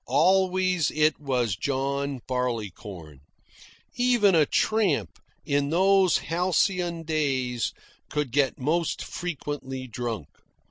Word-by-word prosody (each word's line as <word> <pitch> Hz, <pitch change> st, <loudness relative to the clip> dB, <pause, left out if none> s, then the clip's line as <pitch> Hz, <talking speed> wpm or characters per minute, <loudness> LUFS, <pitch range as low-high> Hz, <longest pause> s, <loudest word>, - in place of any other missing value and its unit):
Always 185 Hz, +2 st, +3 dB
it 155 Hz, -1 st, +2 dB
was 125 Hz, -8 st, 0 dB
John 140 Hz, +2 st, -2 dB
Barleycorn. 105 Hz, -, -4 dB, 0.7 s
Even 240 Hz, -5 st, +3 dB
a 155 Hz, -4 st, +4 dB
tramp, 215 Hz, -8 st, +1 dB, 0.3 s
in 145 Hz, -2 st, +1 dB
those 190 Hz, +2 st, +4 dB
halcyon 175 Hz, 0 st, 0 dB
days, 135 Hz, -6 st, -1 dB, 0.4 s
could 150 Hz, -4 st, -2 dB
get 135 Hz, 0 st, +1 dB
most 160 Hz, +5 st, 0 dB
frequently 145 Hz, -6 st, -5 dB
drunk. 115 Hz, -, -4 dB
145 Hz, 95 wpm, -26 LUFS, 130-180 Hz, 0.7 s, a